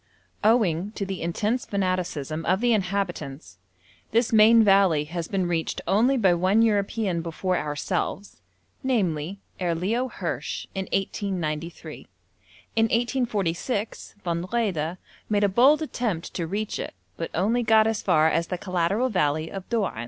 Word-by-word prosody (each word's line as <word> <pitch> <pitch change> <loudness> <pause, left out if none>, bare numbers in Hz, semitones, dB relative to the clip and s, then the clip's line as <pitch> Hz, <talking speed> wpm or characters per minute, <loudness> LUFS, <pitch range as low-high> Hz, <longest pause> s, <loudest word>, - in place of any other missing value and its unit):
Owing 205 -4 +2
to 200 - -3
the 190 -1 -5
intense 210 +9 -1
fanaticism 180 -6 -2
of 185 +2 +3
the 240 +1 +3
inhabitants, 180 - -3 0.5
this 230 +1 +1
main 220 +1 +7
valley 195 -7 +4
has 165 +2 -5
been 190 -2 -1
reached 165 -2 -1
only 240 +7 +3
by 195 -7 +4
one 190 +6 +3
European 205 -4 0
before 175 +3 -2
ourselves 150 +6 -3 0.4
namely, 190 - -1 0.2
Herr 175 -2 0
Leo 225 +9 0
Hirsch, - - -4
in 190 0 -3
1893. 175 -5 -3 0.7
In 225 0 +4
1846 225 -3 -1
Von 170 0 -2
Wrede 185 -8 -1 0.3
made 205 -1 +2
a - - +5
bold 265 +10 +4
attempt 220 - -3
to 170 -2 -3
reach 205 +4 -3
it, - - -5 0.2
but 165 - -4
only 220 +8 +2
got 220 -2 +5
as 220 -1 0
far 155 0 +4
as 165 +1 +1
the 180 - -3
collateral 185 +6 0
valley 155 -5 0
of 195 -1 -7
Doan. 215 - -1
195 Hz, 145 wpm, -25 LUFS, 170-220 Hz, 0.7 s, main